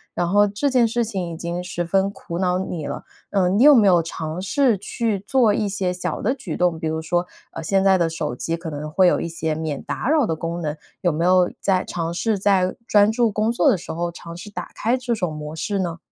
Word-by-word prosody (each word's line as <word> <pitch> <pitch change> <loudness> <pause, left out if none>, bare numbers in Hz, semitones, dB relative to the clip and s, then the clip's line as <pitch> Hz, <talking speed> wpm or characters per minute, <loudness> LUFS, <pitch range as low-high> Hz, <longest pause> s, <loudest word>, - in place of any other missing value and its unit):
然 175 - 0
后 205 +2 +4
这 205 +8 -1
件 250 -3 +4
事 235 +1 0
情 190 -6 -3
已 - - -6
经 170 +1 -4
十 180 -1 -3
分 195 +3 +2
苦 170 -3 -7
恼 180 -1 +1
你 175 -5 -4
了。 - - -5 0.3
呃， 190 -3 +2
你 200 +6 +3
有 295 0 +9
没 225 -4 +5
有 175 -2 +5
尝 160 +1 -5
试 250 +2 +2
去 215 +1 -2
做 220 +1 +2
一 210 - 0
些 190 -2 -1
小 180 - -4
的 250 - +1
举 270 - -6
动， 175 -2 +1
比 160 - -2
如 160 0 -1
说， 175 +2 -1 0.2
呃， - - -6
现 190 +4 +1
在 195 -1 +5
的 170 -2 +1
手 160 -5 -3
机 165 +6 -2
可 165 0 -6
能 150 +1 -5
会 185 +5 +3
有 - - +3
一 - - -3
些 160 -1 -2
免 155 -3 -4
打 260 - -3
扰 305 -4 +4
的 165 - -1
功 170 +2 -4
能， 150 -2 -2 0.3
有 175 - +2
没 165 +2 -1
有 180 0 +4
在 185 -2 +1
尝 165 -1 -3
试 210 +3 0
在 190 -2 +2
专 205 0 +5
注 230 0 +2
工 215 +2 0
作 245 +5 +3
的 225 - +3
时 - - -8
候 170 +1 -2
尝 170 0 -10
试 210 - -9
打 205 - -7
开 230 +3 0
这 245 -2 -2
种 180 -7 -2
模 150 0 -6
式 200 +5 -2
呢？ 170 -3 -2
185 Hz, 270 characters per minute, -22 LUFS, 165-210 Hz, 0.3 s, 有